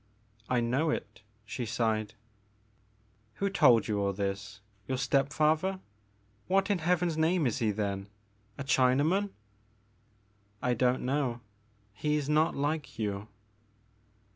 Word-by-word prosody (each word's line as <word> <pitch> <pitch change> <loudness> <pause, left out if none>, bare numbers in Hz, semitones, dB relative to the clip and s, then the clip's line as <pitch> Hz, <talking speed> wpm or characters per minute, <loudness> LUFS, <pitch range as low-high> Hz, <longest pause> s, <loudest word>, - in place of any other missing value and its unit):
I 125 -1 +2
know 130 +7 +1
it," 150 - -4 0.2
she 115 +3 -4
sighed. 110 -1 -1 1.2
Who 200 0 -1
told 125 - +5
you 105 -1 0
all 100 0 0
this? 100 +1 -4 0.3
Your 130 - -1
step 135 +2 +1
father? 155 +6 +1 0.7
What 195 +3 +2
in 195 - +1
Heaven's 170 -1 +1
name 165 0 +2
is 120 +1 0
he 115 -3 +1
then, 100 -1 -2 0.3
— 105 0 -37
a 140 - -4
China 130 -1 +3
man! 195 +6 +1 0.7
" 115 +1 -38 0.5
I 125 +2 +1
don't 125 +1 +1
know; 130 -3 -1 0.5
he 150 +7 0
is 145 -2 -1
not 155 +2 +2
like 145 -3 -2
you." 105 -1 -3
130 Hz, 140 wpm, -30 LUFS, 110-155 Hz, 1.2 s, told